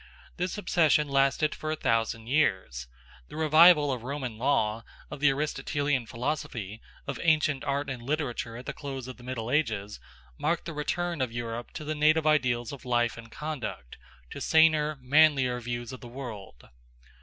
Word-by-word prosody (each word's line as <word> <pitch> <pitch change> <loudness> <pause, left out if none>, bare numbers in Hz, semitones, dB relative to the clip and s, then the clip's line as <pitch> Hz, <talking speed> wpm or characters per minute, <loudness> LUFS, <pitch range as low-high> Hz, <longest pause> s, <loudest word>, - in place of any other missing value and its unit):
This 180 +1 -2
obsession 155 -6 +3
lasted 140 +2 +2
for 155 - -5
a - - 0
thousand 115 -4 0
years. 95 - 0 0.4
The - - -11
revival 155 -1 +6
of 125 -3 -3
Roman 130 -2 -4
law, 115 -4 +1 0.3
of - - -6
the 145 0 +5
Aristotelian 145 -2 -1
philosophy, 115 -5 -4 0.2
of - - -5
ancient 155 -4 +2
art 140 0 -1
and 130 -3 -5
literature 125 -4 -3
at 125 - -9
the - - -4
close 135 -3 -6
of 130 - -8
the 125 - -15
Middle 120 -2 -4
Ages, 110 -9 -1 0.4
marked 170 +2 0
the 165 - -5
return 170 +2 -2
of 130 -3 -1
Europe 120 0 -5
to 155 0 -4
native 155 +1 +3
ideals 125 -6 +2
of 140 -3 -9
life 120 -1 +1
and 115 -1 -12
conduct, 140 - -6 0.3
to - - -7
saner, 155 -2 +4
manlier 135 -2 +4
views 120 +1 -5
of 130 - -9
the 120 - -9
world. 115 - -9
135 Hz, 165 wpm, -28 LUFS, 120-155 Hz, 0.4 s, revival